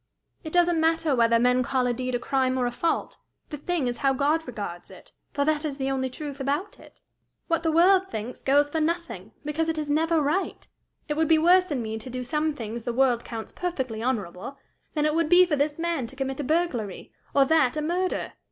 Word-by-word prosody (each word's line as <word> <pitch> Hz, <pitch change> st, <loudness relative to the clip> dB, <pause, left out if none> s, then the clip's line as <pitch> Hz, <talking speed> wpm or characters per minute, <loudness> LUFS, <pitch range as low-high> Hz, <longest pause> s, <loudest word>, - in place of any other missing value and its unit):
"It 315 Hz, -, -6 dB
doesn't 350 Hz, -1 st, +3 dB
matter 325 Hz, -2 st, +2 dB
whether 230 Hz, -1 st, +4 dB
men 250 Hz, +2 st, +3 dB
call 255 Hz, 0 st, 0 dB
a 245 Hz, -, +1 dB
deed 255 Hz, +1 st, -3 dB
a -, -, 0 dB
crime 260 Hz, 0 st, 0 dB
or 250 Hz, -, +1 dB
a 245 Hz, -, -1 dB
fault; 330 Hz, +7 st, -1 dB, 0.3 s
the -, -, -3 dB
thing 330 Hz, 0 st, -1 dB
is 240 Hz, -1 st, -2 dB
how 275 Hz, -2 st, +2 dB
God 295 Hz, +4 st, +1 dB
regards 200 Hz, -7 st, -6 dB
it, -, -, -15 dB, 0.2 s
for 285 Hz, -, 0 dB
that 305 Hz, 0 st, +1 dB
is 290 Hz, -3 st, -3 dB
the 270 Hz, -1 st, -1 dB
only 260 Hz, -1 st, -1 dB
truth 285 Hz, +1 st, -7 dB
about 290 Hz, +9 st, -2 dB
it. -, -, -18 dB, 0.5 s
What 330 Hz, 0 st, +1 dB
the 325 Hz, -1 st, +1 dB
world 370 Hz, +4 st, +5 dB
thinks, 220 Hz, +3 st, -6 dB
goes 285 Hz, +2 st, +3 dB
for 320 Hz, -, 0 dB
nothing, 315 Hz, -, -3 dB
because 315 Hz, +2 st, -1 dB
it 320 Hz, -, -1 dB
is 300 Hz, -1 st, -2 dB
never 325 Hz, +2 st, +2 dB
right. 305 Hz, +6 st, -1 dB, 0.4 s
It 300 Hz, -1 st, -2 dB
would 320 Hz, 0 st, +2 dB
be 320 Hz, -, +5 dB
worse 360 Hz, +3 st, +4 dB
in 265 Hz, -6 st, -2 dB
me 220 Hz, 0 st, -4 dB
to 240 Hz, -, -9 dB
do 250 Hz, 0 st, -4 dB
some 300 Hz, +4 st, -1 dB
things 230 Hz, -2 st, -6 dB
the 240 Hz, -, -2 dB
world 245 Hz, -2 st, +2 dB
counts 225 Hz, -2 st, -7 dB
perfectly 260 Hz, -11 st, -3 dB
honorable, 230 Hz, 0 st, -3 dB, 0.4 s
than 300 Hz, -1 st, +1 dB
it 305 Hz, -, +2 dB
would 330 Hz, -1 st, +1 dB
be 360 Hz, +1 st, +7 dB
for 330 Hz, -4 st, 0 dB
this 290 Hz, +1 st, 0 dB
man 335 Hz, -7 st, -1 dB
to 270 Hz, -, -12 dB
commit 270 Hz, 0 st, -3 dB
a -, -, -1 dB
burglary, 270 Hz, -, -2 dB, 0.2 s
or 275 Hz, -1 st, +6 dB
that 310 Hz, -3 st, +3 dB
a -, -, 0 dB
murder. 360 Hz, +4 st, -1 dB
285 Hz, 225 wpm, -26 LUFS, 250-320 Hz, 0.5 s, be